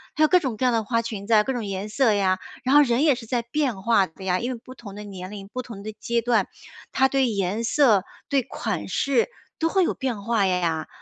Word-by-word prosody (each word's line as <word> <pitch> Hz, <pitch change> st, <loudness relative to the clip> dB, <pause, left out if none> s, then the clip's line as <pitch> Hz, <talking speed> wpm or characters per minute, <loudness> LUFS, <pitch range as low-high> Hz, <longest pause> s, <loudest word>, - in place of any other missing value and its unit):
还 310 Hz, -, +3 dB
有 -, -, +7 dB
各 365 Hz, +3 st, +5 dB
种 260 Hz, -9 st, -3 dB
各 255 Hz, -, 0 dB
样 -, -, +3 dB
的 225 Hz, -1 st, +1 dB
花 230 Hz, +2 st, 0 dB
裙 215 Hz, -3 st, -6 dB
子 230 Hz, -, +2 dB
啊， 210 Hz, -1 st, +6 dB
各 265 Hz, -, -2 dB
种 240 Hz, -3 st, -3 dB
颜 195 Hz, 0 st, -4 dB
色 225 Hz, 0 st, +3 dB
呀， 190 Hz, -2 st, +1 dB, 0.2 s
然 260 Hz, +2 st, +2 dB
后 295 Hz, -, +9 dB
人 245 Hz, +1 st, +1 dB
也 295 Hz, -4 st, +4 dB
是 240 Hz, -2 st, -9 dB
在 240 Hz, +1 st, -1 dB
变 240 Hz, -3 st, -2 dB
化 220 Hz, -3 st, +4 dB
的 160 Hz, +4 st, -14 dB
呀， 180 Hz, -1 st, +1 dB
因 245 Hz, +2 st, -2 dB
为 240 Hz, -, -8 dB
不 255 Hz, -, -11 dB
同 205 Hz, -5 st, -10 dB
的 210 Hz, -, -7 dB
年 190 Hz, -2 st, -8 dB
龄， 200 Hz, -2 st, -8 dB
不 255 Hz, +5 st, -5 dB
同 230 Hz, -5 st, -10 dB
的 215 Hz, +1 st, -6 dB
阶 235 Hz, +2 st, -1 dB
段， 230 Hz, -4 st, +2 dB, 0.4 s
她 265 Hz, -, +3 dB
对 265 Hz, -1 st, +2 dB
颜 200 Hz, +1 st, -1 dB
色、 230 Hz, -5 st, +4 dB, 0.3 s
对 275 Hz, -2 st, +3 dB
款 250 Hz, -, -4 dB
式 275 Hz, -, +1 dB, 0.3 s
都 325 Hz, -, +1 dB
会 380 Hz, +2 st, +3 dB
有 -, -, 0 dB
变 245 Hz, -7 st, -3 dB
化 225 Hz, -2 st, +2 dB
呀， 175 Hz, -4 st, 0 dB
230 Hz, 280 characters per minute, -24 LUFS, 200-260 Hz, 0.4 s, 后